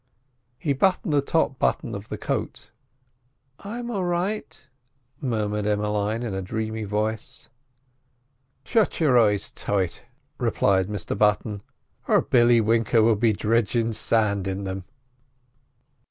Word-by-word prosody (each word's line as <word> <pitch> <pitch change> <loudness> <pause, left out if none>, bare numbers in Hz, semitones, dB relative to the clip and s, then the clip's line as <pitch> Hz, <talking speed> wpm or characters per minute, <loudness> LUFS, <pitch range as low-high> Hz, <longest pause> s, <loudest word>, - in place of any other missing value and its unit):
He 145 0 0
buttoned 175 +1 +1
the 145 - +4
top 140 -3 0
button - - 0
of - - -7
the - - -4
coat. - - -4 0.9
"I'm 235 +4 -6
a'right," 180 - -2 0.5
murmured 105 -4 -1
Emmeline 105 +2 0
in 115 -4 -3
a 95 - -2
dreamy 110 +3 -3
voice. 105 +1 -3 1.2
"Shut 225 -3 +1
your 135 -7 +5
eyes 105 -2 +2
tight," 95 -4 -2 0.3
replied 95 -2 +2
Mr 105 -4 -3
Button, 105 -1 +1 0.5
"or - - +4
Billy 120 -1 +4
Winker 115 0 +3
will 115 0 +4
be 110 +2 +3
dridgin' 115 +2 +1
sand 105 -3 +1
in 95 +1 -3
them. 95 -1 -5
110 Hz, 120 wpm, -24 LUFS, 105-125 Hz, 1.2 s, your